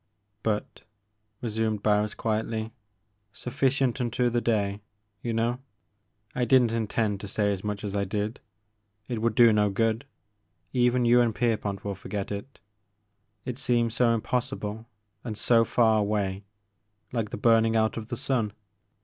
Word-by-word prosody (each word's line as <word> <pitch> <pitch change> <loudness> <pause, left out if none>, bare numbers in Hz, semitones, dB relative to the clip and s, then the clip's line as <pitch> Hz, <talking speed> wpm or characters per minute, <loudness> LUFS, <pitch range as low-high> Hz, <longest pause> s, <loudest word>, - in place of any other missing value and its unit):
"But," 105 -2 -2 0.6
resumed 110 -2 -1
Barris 105 0 +2
quietly, 110 0 -2 0.6
sufl5cient 130 0 0
unto 120 0 +1
the 120 0 +1
day,' 105 -3 0 0.4
you 120 - -2
know, 115 +2 0 0.4
— - - -47 0.3
I 125 - +1
did 125 +1 +5
n't 115 - 0
intend 110 -2 0
to 100 - -7
say 105 +1 +1
as 95 - -6
much 105 -1 -3
as 100 -1 -3
I 100 - +1
did, 105 +3 -3 0.4
— 105 0 -43
^it 120 - -1
would 115 -1 0
do 120 -2 +7
no 105 -1 +3
good, 115 +5 0 0.3
— 90 -3 -46
even 125 0 +3
you 120 +1 +6
and 115 -3 +1
Kerpont 105 -5 -1
will 100 - -1
forget 100 +1 -5
it, 100 +7 -6 0.4
— 105 -1 -47
it 125 0 -4
seems 120 -4 +1
so 120 -1 +3
im 115 -1 +1
possible 115 -3 -3 0.4
and 110 -3 -5
so 115 +1 +4
far 110 -2 +3
away, 100 -2 -1 0.3
— 105 +3 -38
^like 115 -4 -1
the - - -5
burning 115 -1 +4
out 110 0 +2
of 115 0 -6
the 120 - -3
sun. 125 -6 0
110 Hz, 170 wpm, -27 LUFS, 105-120 Hz, 0.6 s, do